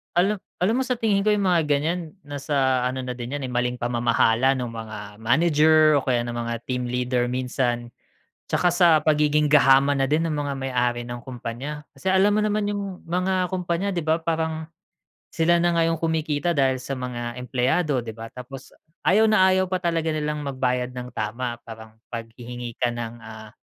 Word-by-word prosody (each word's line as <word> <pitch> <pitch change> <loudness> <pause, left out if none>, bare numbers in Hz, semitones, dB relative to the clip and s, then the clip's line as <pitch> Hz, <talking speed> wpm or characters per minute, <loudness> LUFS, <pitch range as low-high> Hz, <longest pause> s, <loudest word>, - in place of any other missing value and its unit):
Alam 195 +3 +2 0.2
alam 215 +6 +2
mo - - +1
sa 250 - +1
tingin 210 -4 +1
ko - - +4
yung 205 -1 0
mga 175 -2 +3
ganyan 155 +3 -1
nasa 140 -3 0
ano 130 +1 -3
na 125 - -4
din 120 +2 -6
'yan, 145 - -4
eh, 125 - -4
maling 125 0 0
pamamahala 120 +1 +2
ng 125 -2 -3
mga 110 -2 -7 0.2
manager 155 +3 +4
o - - -7
kaya 125 -2 +2
ng 120 - -4
mga 115 0 -2
team 125 -1 -2
leader 125 0 0
minsan. 125 -1 -1 0.6
Tsaka 175 - +2
sa 175 -1 +5
pagiging 150 -1 +3
gahaman 140 -1 +5
na 135 - +3
din 155 +2 +2
ng 155 - -2
mga 145 -1 -2
may-ari 125 -2 0
ng 120 0 -7
kumpanya. 130 +4 -6
Kasi 190 - -1
alam 195 +2 +4
mo 215 - +2
naman 210 -1 0
yung 200 -2 -4
mga 185 +1 0
kumpanya, 180 +1 -1
di 170 - -1
ba? 160 +1 +1
Parang 160 -1 -2 0.7
sila 170 +1 +3
na 175 0 +2
nga 165 - +3
yung 165 - 0
kumikita 160 0 0
dahil 135 -1 +3
sa 135 - -6
mga 125 -2 -5
empleyado, 130 +2 0
di 110 - -6
ba? 115 +1 -9
Tapos 130 +1 -10 0.4
ayaw 215 +4 +5
na 190 -3 +5
ayaw 185 0 +2
pa 185 - +1
talaga 165 -2 0
nilang 150 -1 -2
magbayad 125 -2 -1
ng 125 0 -6
tama 120 +3 -3
parang 110 -1 -11 0.2
paghihingi 120 +1 -7
ka 120 -1 0
ng, 120 -1 -5
ah, 110 -1 -10
140 Hz, 190 wpm, -24 LUFS, 125-165 Hz, 0.7 s, sa